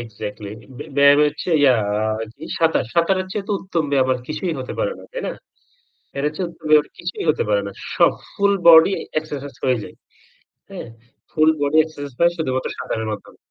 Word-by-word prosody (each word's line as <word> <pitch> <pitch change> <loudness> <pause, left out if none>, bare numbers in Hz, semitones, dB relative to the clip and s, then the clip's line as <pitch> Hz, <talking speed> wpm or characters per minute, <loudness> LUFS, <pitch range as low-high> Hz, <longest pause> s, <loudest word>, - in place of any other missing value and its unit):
Exactly 105 -2 -7 0.3
বে - - -6
ব্যায়াম 140 0 +6
এচ্ছে 150 +4 -6
ইয়া 135 -3 +6 0.6
কি 155 - -10
সাঁতার। 165 -4 +2
সাঁতারের 185 +2 +2
চেয়ে 200 -2 -4
তো - - 0
উত্তম 170 -4 -2
ব্যায়াম 130 -2 +2
আর 125 - -2
কিছুই 160 +2 -2
হতে 130 - -6
পারে - - 0
না। - - -12
তাই - - -5
না? - - -2 0.8
এর 140 - -2
চেয়ে 180 +2 -2
উত্তম 165 - -20
ব্যায়াম 150 -1 +6
কিছুই 175 +1 -5
হতে - - 0
পারে 100 -1 +2
না। 100 - -6 0.2
সব - - +4 0.2
ফুল 200 0 +2
বডি 165 +3 +8 0.3
এক্সারসাইজ 145 -3 -7
হয়ে 130 -3 +2
যায়। - - -10 0.8
হ্যাঁ? - - -7 0.4
ফুল 155 0 +4
বডি 145 +2 +1
এক্সারসাইজ 145 -3 -8
হয় 170 0 +4
শুধুমাত্র 130 -6 -2
সাঁতারের 110 0 -3
মাধ্যমে। 100 - -9
155 Hz, 180 wpm, -21 LUFS, 130-170 Hz, 0.8 s, বডি